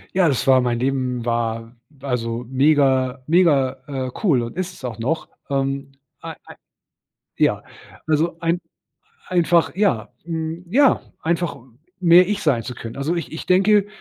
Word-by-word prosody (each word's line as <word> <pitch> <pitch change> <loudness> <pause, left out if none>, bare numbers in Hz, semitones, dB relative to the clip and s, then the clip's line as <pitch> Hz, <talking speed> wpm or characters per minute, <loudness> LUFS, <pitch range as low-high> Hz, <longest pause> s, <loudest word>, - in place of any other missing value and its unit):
Ja, 185 -3 +4
das 135 -2 -1
war 130 -1 +6
mein 120 -1 -1
Leben 130 -2 -1
war, 115 0 -2 0.3
also, 120 -3 -3
mega 130 -1 +2
mega, 145 -6 +3 0.2
äh, 125 - -6
cool 140 - +3
und 115 - -7
ist's 180 -6 -5
auch 120 -4 -5
noch. 135 +8 -2 0.2
Ähm. 135 0 -2 0.3
Ei - - -7
ei - - -12 0.8
Ja. - - +2 0.5
Also, 160 +2 +1
ein 170 +2 0 0.7
einfach, 170 -2 +2
ja, 185 - 0
hm, 165 +1 -4
ja, 270 +8 +4 0.2
einfach 170 0 -1 0.4
mehr 180 +1 +6
ich 210 -1 -2
sein 130 -7 +2
zu 125 - -6
können. 115 0 -8
Also, 150 +5 -1
ich 155 -8 -5
ich 160 - -7
denke, 200 +2 +4
140 Hz, 150 wpm, -21 LUFS, 125-170 Hz, 0.8 s, war